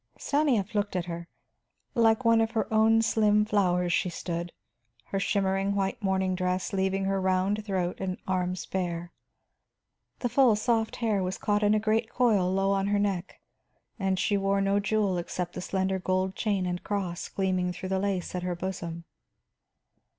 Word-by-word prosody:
Stanief 270 Hz, -10 st, +1 dB
looked 205 Hz, -2 st, -1 dB
at 180 Hz, -2 st, -1 dB
her. 170 Hz, -1 st, -6 dB, 0.7 s
Like 230 Hz, 0 st, +3 dB
one 230 Hz, 0 st, +5 dB
of 225 Hz, -, +1 dB
her 220 Hz, -, +1 dB
own 225 Hz, +1 st, +4 dB
slim 210 Hz, -2 st, +3 dB
flowers 180 Hz, -4 st, +1 dB
she 180 Hz, -, +1 dB
stood, 170 Hz, 0 st, -4 dB, 0.5 s
her 195 Hz, -, -2 dB
shimmering 195 Hz, 0 st, 0 dB
white 195 Hz, +1 st, -1 dB
morning 190 Hz, -1 st, +1 dB
dress 185 Hz, +1 st, -1 dB
leaving 190 Hz, 0 st, 0 dB
her 195 Hz, 0 st, 0 dB
round 190 Hz, +3 st, +1 dB
throat 185 Hz, -4 st, -2 dB
and 185 Hz, -1 st, -2 dB
arms 185 Hz, -1 st, -1 dB
bare. 175 Hz, -2 st, -3 dB, 1.1 s
The 245 Hz, -, -1 dB
full 245 Hz, -2 st, +5 dB
soft 225 Hz, +1 st, 0 dB
hair 220 Hz, -4 st, 0 dB
was 185 Hz, +1 st, -2 dB
caught 205 Hz, 0 st, 0 dB
in 210 Hz, 0 st, +4 dB
a -, -, +3 dB
great 220 Hz, +1 st, +1 dB
coil 210 Hz, -7 st, +2 dB
low 195 Hz, +1 st, +1 dB
on 195 Hz, 0 st, +1 dB
her 205 Hz, 0 st, +2 dB
neck, 195 Hz, -3 st, -2 dB, 0.8 s
she 200 Hz, +2 st, +1 dB
wore 195 Hz, 0 st, +1 dB
no 195 Hz, +1 st, +2 dB
jewel 200 Hz, -3 st, +1 dB
except 175 Hz, 0 st, -4 dB
the -, -, -5 dB
slender 190 Hz, +1 st, -1 dB
gold 185 Hz, +1 st, -1 dB
chain 200 Hz, -4 st, 0 dB
and 180 Hz, 0 st, -3 dB
cross 190 Hz, -4 st, -3 dB
gleaming 185 Hz, -2 st, 0 dB
through 180 Hz, +1 st, -6 dB
the 190 Hz, 0 st, 0 dB
lace 195 Hz, -3 st, -2 dB
at 180 Hz, -, -2 dB
her 180 Hz, 0 st, -2 dB
bosom. 170 Hz, -2 st, -5 dB
195 Hz, 170 wpm, -28 LUFS, 185-210 Hz, 1.1 s, one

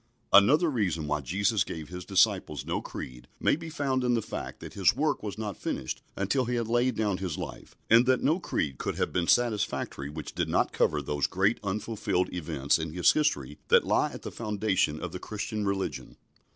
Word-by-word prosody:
Another 150 Hz, -, +7 dB
reason 90 Hz, -, 0 dB
why 75 Hz, 0 st, -1 dB
Jesus 100 Hz, -, +1 dB
gave 80 Hz, -2 st, -7 dB
His 90 Hz, 0 st, -7 dB
disciples 95 Hz, -1 st, +2 dB
no -, -, -1 dB
creed 65 Hz, -1 st, -8 dB
may -, -, +3 dB
be 165 Hz, +1 st, -8 dB
found 135 Hz, -4 st, -1 dB
in 120 Hz, -1 st, +2 dB
the 115 Hz, -, +1 dB
fact -, -, -6 dB
that -, -, -9 dB
His 95 Hz, +1 st, +3 dB
work 150 Hz, +2 st, 0 dB
was 105 Hz, -2 st, -5 dB
not 105 Hz, -2 st, -4 dB
finished 65 Hz, -, -4 dB, 0.2 s
until 125 Hz, +7 st, +1 dB
He 125 Hz, +1 st, -1 dB
had 115 Hz, -2 st, -1 dB
laid 120 Hz, +1 st, +2 dB
down 105 Hz, -4 st, 0 dB
His 90 Hz, -4 st, -3 dB
life, -, -, -8 dB
and 115 Hz, +3 st, +6 dB
that 130 Hz, -1 st, +3 dB
no 160 Hz, +5 st, +3 dB
creed 70 Hz, -, -2 dB
could -, -, -2 dB
have -, -, -1 dB
been 85 Hz, -2 st, 0 dB
satisfactory 105 Hz, -, +1 dB
which 75 Hz, 0 st, -7 dB
did -, -, -1 dB
not -, -, +1 dB
cover -, -, +1 dB
those 75 Hz, -1 st, 0 dB
great 95 Hz, +5 st, +1 dB
unfulfilled 100 Hz, -2 st, -1 dB
events 75 Hz, -4 st, 0 dB
in 80 Hz, -1 st, -4 dB
His 90 Hz, 0 st, +5 dB
history 75 Hz, -, 0 dB
that -, -, +5 dB
lie -, -, +2 dB
at -, -, -9 dB
the -, -, -5 dB
foundation 105 Hz, -8 st, 0 dB
of 90 Hz, -, -5 dB
the 90 Hz, -, -6 dB
Christian 105 Hz, +1 st, -4 dB
religion. 100 Hz, -1 st, -3 dB
100 Hz, 205 wpm, -28 LUFS, 85-120 Hz, 0.2 s, Another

